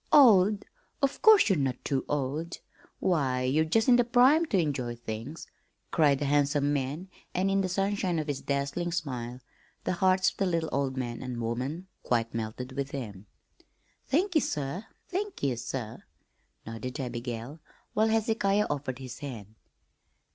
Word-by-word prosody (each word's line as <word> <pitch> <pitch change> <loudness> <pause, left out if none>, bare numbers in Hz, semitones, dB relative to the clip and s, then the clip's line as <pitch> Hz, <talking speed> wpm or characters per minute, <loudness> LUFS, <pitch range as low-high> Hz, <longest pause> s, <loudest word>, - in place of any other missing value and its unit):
"Old? 210 -8 +6 0.4
Of 275 - +1
course 440 -4 +7
you're 190 -7 +3
not 130 -3 -2
too 135 -2 0
old! 150 +4 -2 0.4
Why, 135 -8 +1
you're 140 +5 +2
just 220 +8 +2
in 245 -1 +7
the 245 - +5
prime 260 +7 +5
to 210 - +1
enjoy 135 -8 -1
things," 115 +6 -6 0.5
cried 145 -4 +4
the 145 - -2
handsome 145 0 +2
man, 145 +6 -2 0.3
and 190 +2 +2
in 195 0 +3
the 185 - -1
sunshine 195 -1 0
of 155 - -1
his 145 -3 -3
dazzling 140 +5 -1
smile 125 -7 -4 0.4
the - - 0
hearts 185 +1 +3
of - - -20
the 195 - +1
little 165 -2 0
old 135 -1 -1
man 120 -2 -3
and 125 -2 -5
woman 125 +9 -3 0.2
quite 115 -2 0
melted 115 +3 -4
within 135 -4 -4
them. 95 0 -14 0.8
"Thank 360 +8 +1
ye, 310 - +4
sir, 150 +9 -3 0.2
thank 400 +2 -4
ye 135 -3 +2
sir," 115 -1 -5 0.6
nodded 115 +5 -6
Abigail, 120 +2 -5 0.3
while 215 +1 +3
Hezekiah 220 -2 +2
offered 140 -3 -3
his 130 -2 -8
hand. 110 -7 -7
145 Hz, 160 wpm, -29 LUFS, 125-190 Hz, 0.8 s, course